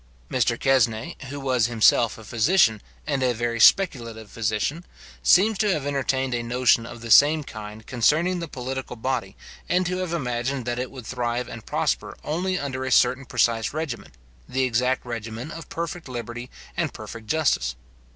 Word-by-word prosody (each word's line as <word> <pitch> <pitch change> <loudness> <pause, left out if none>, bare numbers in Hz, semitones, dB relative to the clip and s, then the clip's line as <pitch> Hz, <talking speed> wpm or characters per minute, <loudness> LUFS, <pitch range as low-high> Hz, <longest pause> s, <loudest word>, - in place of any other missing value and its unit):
Mr - - +1
Quesnai, 125 +2 +2
who 145 +2 -6
was 130 -4 +1
himself 115 0 +3
a 115 - -11
physician, 115 - +3 0.2
and 135 - -1
a 125 -2 +2
very 115 0 -2
speculative 115 - +3
physician, 115 +9 -1 0.4
seems 205 +2 +4
to 210 -2 +3
have 150 -6 -1
entertained 135 -2 0
a 120 - 0
notion 120 -1 +2
of 120 -1 -10
the 115 -1 -5
same 150 +6 +7
kind 110 -3 -9
concerning 155 +9 +2
the 170 - -4
political 130 -2 -5
body, 120 -5 -3 0.3
and 180 +1 +2
to 180 +1 -1
have 185 -2 -3
imagined 130 -4 -2
that 120 0 -2
it 125 0 -3
would 130 -4 -10
thrive 120 0 -2
and 115 - -9
prosper - - -1
only 180 +5 -1
under 130 -3 -3
a 130 - -3
certain 130 +2 +3
precise 115 -2 +1
regimen, 135 - -4 0.4
the 130 0 0
exact 125 +1 +1
regimen 115 +3 -5
of 165 +1 -9
perfect 170 -2 -5
liberty 120 0 -6 0.3
and - - -2
perfect 115 -2 -9
justice. 130 - +1
125 Hz, 170 wpm, -24 LUFS, 115-145 Hz, 0.4 s, same